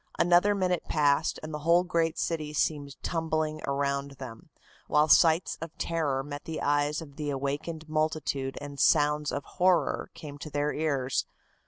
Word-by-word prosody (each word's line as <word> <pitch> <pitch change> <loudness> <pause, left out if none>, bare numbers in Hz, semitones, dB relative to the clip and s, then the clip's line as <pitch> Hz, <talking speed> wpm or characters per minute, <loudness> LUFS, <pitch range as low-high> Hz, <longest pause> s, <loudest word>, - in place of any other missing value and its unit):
Another 175 +4 +4
minute 180 -3 0
passed 145 0 +2
and 155 0 -6
the 150 - -3
whole 170 +3 +4
great 165 -2 0
city 155 -3 -2
seemed 145 -2 -1
tumbling 155 -2 -1
around 140 0 -1
them, 130 -4 -10 0.4
while 150 +1 +3
sights 160 +2 +4
of 165 -1 -7
terror 145 -5 -1
met 145 0 -7
the 160 -1 -4
eyes 145 +2 +1
of 140 -3 -15
the 150 -1 -3
awakened 145 +4 -3
multitude 155 -3 -1
and 145 -1 -8
sounds 150 +1 +3
of 140 - -3
horror 180 +3 +1
came 145 -2 -9
to 155 - -7
their 145 0 -1
ears. 140 -4 -1
150 Hz, 160 wpm, -28 LUFS, 140-160 Hz, 0.4 s, Another